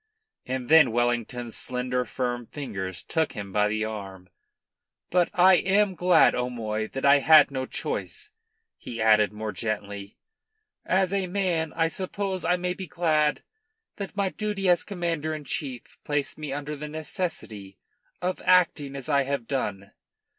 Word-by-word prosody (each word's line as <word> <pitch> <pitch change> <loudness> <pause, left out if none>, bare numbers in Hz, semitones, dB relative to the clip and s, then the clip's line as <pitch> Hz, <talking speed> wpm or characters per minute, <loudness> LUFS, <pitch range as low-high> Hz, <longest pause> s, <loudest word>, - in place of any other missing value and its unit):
And 130 -1 -3
then 155 -5 +6
Wellington's 120 0 -1
slender, 125 0 -2
firm 120 -1 -3
fingers 95 - -5
took 160 -2 -1
him 100 -2 -7
by 105 0 +3
the 110 +1 -1
arm. 95 -4 -7 0.8
"But 180 -1 +3
I 185 -1 +6
am 195 +1 +2
glad, 180 0 +5
O'Moy, 110 -3 -2
that 135 +4 -4
I 140 0 +7
had 155 +1 +7
no 130 -1 -3
choice," 425 - -4 0.5
he 115 - -7
added 110 -2 +4
more 105 0 -5
gently. 100 -3 -5 0.7
"As 190 0 +1
a 195 -2 0
man, 175 -4 0
I 165 -1 +2
suppose 190 +2 -3
I 180 - +2
may 180 0 -1
be 185 0 -7
glad 155 -2 +1 0.5
that 200 0 -6
my 200 -1 +1
duty 205 -1 -2
as 175 -1 +4
Commander 165 -5 -2
in 155 - -7
Chief 130 -2 -6
placed 145 -1 -2
me 150 -3 -6
under 145 +2 -4
the 150 +1 -7
necessity 150 - -5 0.5
of 185 +1 -2
acting 165 -6 +3
as 135 -2 -6
I 140 -2 +3
have 140 -3 -2
done." 100 -7 -3
140 Hz, 155 wpm, -26 LUFS, 115-175 Hz, 0.8 s, I